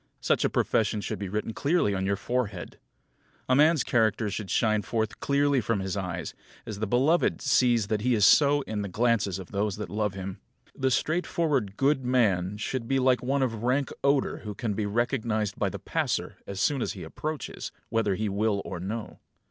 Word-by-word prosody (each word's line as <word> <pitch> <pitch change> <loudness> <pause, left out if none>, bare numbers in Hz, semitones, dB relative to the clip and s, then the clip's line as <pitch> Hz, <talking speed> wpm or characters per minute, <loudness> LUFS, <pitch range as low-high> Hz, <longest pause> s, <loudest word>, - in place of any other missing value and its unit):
Such - - +1
a - - +2
profession 110 -1 +1
should 100 - -4
be 100 -2 -4
written 105 +3 -3
clearly 145 - +1
on 95 0 -1
your 100 - +1
forehead. 105 -3 -3 0.7
A 130 - +3
man's 150 0 +5
character 110 -2 +1
should 100 -1 -5
shine 110 -3 +2
forth 110 +2 -2
clearly 140 -1 +2
from 115 -1 0
his 95 0 -3
eyes; 90 -3 -4 0.3
as 105 -2 -6
the 110 - -1
beloved 135 - +2
sees 120 -5 +3
that 105 0 -1
he 125 +1 +2
is 105 -3 +4
so 145 -1 +5
in 110 -5 -4
the 100 - -4
glances 110 -2 +1
of 95 -2 -9
those 100 0 -1
that 105 - -6
love 105 -2 -1
him. 95 0 -6 0.4
The 130 0 +1
straightforward, 150 - 0
good 135 0 +2
man 105 -7 +1
should 115 +2 -3
be 135 - +1
like 130 -1 +3
one 135 +2 +1
of 115 -4 -2
rank 130 +3 +1
odour 140 -1 +2
who 105 -2 -7
can 110 -2 -2
be 105 0 -2
recognised 110 -2 -1
by - - +1
the - - -6
passer - - -2
by - - -5
as 95 - -6
soon 135 +6 +1
as - - -1
he 95 -5 -8
approaches, 150 - -5 0.2
whether 110 -4 +1
he 110 +2 -2
will 100 0 0
or 95 - -5
no. 105 +5 -5
110 Hz, 200 wpm, -27 LUFS, 100-130 Hz, 0.7 s, man's